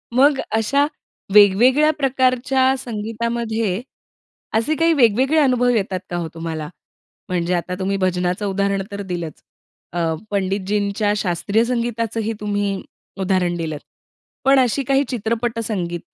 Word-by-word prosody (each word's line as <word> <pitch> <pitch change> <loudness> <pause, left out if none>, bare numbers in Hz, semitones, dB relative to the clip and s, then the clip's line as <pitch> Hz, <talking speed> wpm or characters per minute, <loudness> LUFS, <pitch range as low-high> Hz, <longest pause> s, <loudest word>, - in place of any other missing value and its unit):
मग 275 +2 +5
अशा 245 +6 +2 0.5
वेगवेगळ्या 240 +9 +6
प्रकारच्या 260 0 +2
संगीतामध्ये, 225 -2 -2 0.7
असे 230 +8 +2
काही 330 +1 +3
वेगवेगळे 265 +2 +3
अनुभव 250 -4 +3
येतात 195 -5 0
का 175 - -2
हो 170 -2 -3
तुम्हाला? 160 -2 -5 0.6
म्हणजे 180 0 0
आता 180 +1 -2
तुम्ही 195 +1 -1
भजनाचं 180 +1 0
उदाहरण 200 0 0
तर 200 0 -5
दिलंच, 175 -5 -5 0.5
अ, 165 -1 0 0.2
पंडितजींच्या 200 +1 0
शास्त्रीय 200 +3 +1
संगीताचंही 230 -2 -2
तुम्ही 205 -2 -1 0.4
उदाहरण 185 -2 +1
दिलंत. 155 -3 -4 0.6
पण 270 0 +5
अशी 260 +1 +2
काही 275 +2 +2
चित्रपट 230 0 -2
संगीत 175 -6 -3
210 Hz, 120 wpm, -20 LUFS, 185-245 Hz, 0.7 s, वेगवेगळ्या